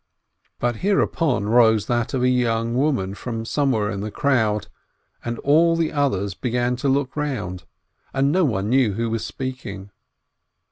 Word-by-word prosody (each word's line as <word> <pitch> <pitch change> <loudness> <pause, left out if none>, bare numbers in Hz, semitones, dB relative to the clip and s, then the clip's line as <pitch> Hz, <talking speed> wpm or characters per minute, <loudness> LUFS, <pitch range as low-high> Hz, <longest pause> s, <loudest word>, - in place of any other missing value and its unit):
But 120 -2 0
hereupon 165 - +1
rose 110 -2 +4
that 120 +2 -1
of 125 - 0
a - - +4
young 115 -2 +1
woman 125 -8 0
from 115 +1 -5
somewhere 115 -6 0
in 100 - -4
the 105 +2 -4
crowd, 110 -6 +1 0.6
and 120 0 -3
all 165 +4 +3
the 165 -1 0
others 100 - 0
began 125 +3 -1
to 140 +2 -1
look 135 -1 0
round, 120 -12 -3 0.5
and 135 +1 +1
no 185 +3 +3
one 105 - 0
knew 125 -3 +3
who 115 +4 -2
it - - -2
was 110 -1 -2
speaking. 105 -5 -6
120 Hz, 160 wpm, -22 LUFS, 110-140 Hz, 0.6 s, rose